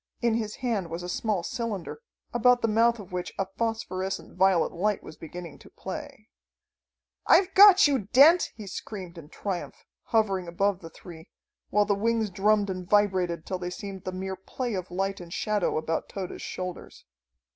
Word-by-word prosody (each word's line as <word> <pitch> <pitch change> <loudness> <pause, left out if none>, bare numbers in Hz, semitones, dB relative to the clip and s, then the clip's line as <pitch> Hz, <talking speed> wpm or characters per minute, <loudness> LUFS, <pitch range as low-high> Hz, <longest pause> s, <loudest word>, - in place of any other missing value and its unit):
In 235 -2 +1
his 220 -2 -2
hand 220 -9 -2
was 165 +2 -5
a - - -5
small 200 0 -1
cylinder, 230 - -4 0.3
about 245 +1 +4
the - - +3
mouth 230 +2 +3
of 200 -3 -11
which 180 0 -4
a 195 - 0
phosphorescent 195 -5 -3
violet 185 -2 +3
light 205 +4 -1
was 155 - -10
beginning 170 0 -9
to - - -16
play. - - -8 1.0
"I've 380 +1 +5
got 400 -3 +9
you, 265 -9 0
Dent," 320 +7 +7
he 215 - -9
screamed 185 -2 -7
in 150 -2 -13
triumph, 185 0 -5 0.2
hovering 195 -6 +1
above 190 +3 0
the 165 - -10
three, 165 -1 -12 0.4
while 205 +1 +3
the 205 - +2
wings 220 0 0
drummed 205 +1 +2
and 185 -1 -6
vibrated 185 -5 +2
till 185 - -3
they 175 0 -4
seemed 190 +1 -7
the 185 - -4
mere 190 +1 -4
play 235 +6 -5
of 185 -2 -4
light 195 +2 -2
and 175 -1 -10
shadow 210 -2 0
about 160 +1 -2
Tode's 190 -2 -6
shoulders. 180 -1 -7
195 Hz, 175 wpm, -27 LUFS, 180-225 Hz, 1.0 s, got